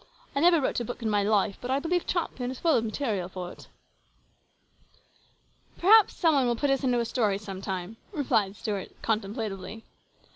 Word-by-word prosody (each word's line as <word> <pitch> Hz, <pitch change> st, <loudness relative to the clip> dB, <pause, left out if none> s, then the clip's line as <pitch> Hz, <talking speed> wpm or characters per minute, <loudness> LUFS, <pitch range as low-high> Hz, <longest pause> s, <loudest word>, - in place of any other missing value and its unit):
" -, -, -29 dB
I -, -, +2 dB
never 340 Hz, +1 st, +5 dB
wrote 265 Hz, -, 0 dB
a -, -, -2 dB
book 245 Hz, +1 st, -6 dB
in 220 Hz, -, 0 dB
my 205 Hz, -1 st, +3 dB
life, 200 Hz, -1 st, +1 dB
but 245 Hz, -, -5 dB
I 265 Hz, -, +2 dB
believe 340 Hz, +4 st, -1 dB
Champion 265 Hz, -8 st, -2 dB
is 260 Hz, -, -5 dB
full 330 Hz, -3 st, +3 dB
of 225 Hz, -, +2 dB
material 215 Hz, -6 st, -2 dB
for 180 Hz, -1 st, -6 dB
it" -, -, -14 dB, 0.7 s
" -, -, -37 dB
Perhaps 430 Hz, +4 st, +6 dB
some 330 Hz, -3 st, +3 dB
one 270 Hz, -3 st, +3 dB
will 240 Hz, -, +1 dB
put 280 Hz, +4 st, +1 dB
us 275 Hz, +1 st, +1 dB
into 250 Hz, -2 st, +2 dB
a 235 Hz, -, 0 dB
story 215 Hz, -5 st, +1 dB
sometime," 195 Hz, 0 st, -5 dB, 0.3 s
said 210 Hz, -5 st, +2 dB
Stuart 205 Hz, -2 st, -5 dB
contemplatively. 215 Hz, -1 st, -3 dB
225 Hz, 190 wpm, -27 LUFS, 200-275 Hz, 0.7 s, Perhaps